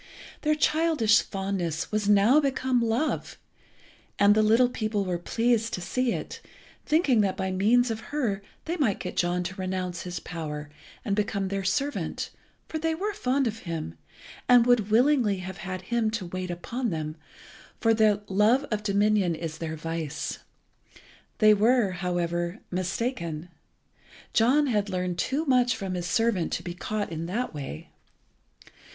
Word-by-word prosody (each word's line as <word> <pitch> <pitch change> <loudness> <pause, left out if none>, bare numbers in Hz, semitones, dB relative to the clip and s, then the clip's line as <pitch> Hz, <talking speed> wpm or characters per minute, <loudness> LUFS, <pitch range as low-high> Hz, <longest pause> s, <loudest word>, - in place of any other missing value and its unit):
Their 305 0 +2
childish 300 -8 +3
fondness 190 -5 -3
was 210 -1 0
now 210 +8 +6
become 260 -3 +1
love, 230 +7 -1 0.8
and 205 0 +6
the 215 - +3
little 225 +4 +5
people 215 -4 -2
were 180 -2 -2
pleased 225 +4 +1
to - - -6
see 245 +7 0
it, - - -5 0.5
thinking 295 -7 +3
that 195 -2 0
by 190 -1 -1
means 230 +6 +3
of 220 - -3
her 235 -10 -1 0.2
they 340 +2 -2
might 245 - +1
get 180 - -5
John 175 0 +1
to 185 - -4
renounce 185 -2 -3
his 180 -1 -5
power, 150 -3 -6 0.3
and 200 -3 0
become 200 -2 -1
their 195 0 -2
servant, 275 +10 -2 0.4
for 315 - -4
they 325 0 0
were 410 +5 -2
fond 270 -8 0
of 225 -1 -2
him, 165 - -5 0.6
and 245 -1 +7
would 240 -4 +3
willingly 240 -3 +3
have 185 0 -7
had 185 +2 -5
him 230 +2 0
to 215 -3 -3
wait 185 +1 -5
upon 235 +8 -3
them, 155 -3 -3 0.6
for 225 -1 +3
the 215 -2 +3
love 215 +7 +3
of 210 -1 0
dominion 205 -3 +2
is 160 -1 -6
their 160 -1 -4
vice. 165 -1 -4 1.0
They 215 -1 +6
were, 220 0 +3
however, 175 0 -2
mistaken. 180 -3 -3 0.8
John 260 +7 +4
had 210 -6 0
learned 180 -2 -2
too 290 +5 0
much 250 -4 +3
from 195 -4 -4
his 175 -1 -3
servant 215 -2 +1
to 170 - -2
be 175 -1 -5
caught 205 +2 -3
in 165 +1 -4
that 235 +5 -2
way. 135 - -7
205 Hz, 160 wpm, -27 LUFS, 180-240 Hz, 1.0 s, and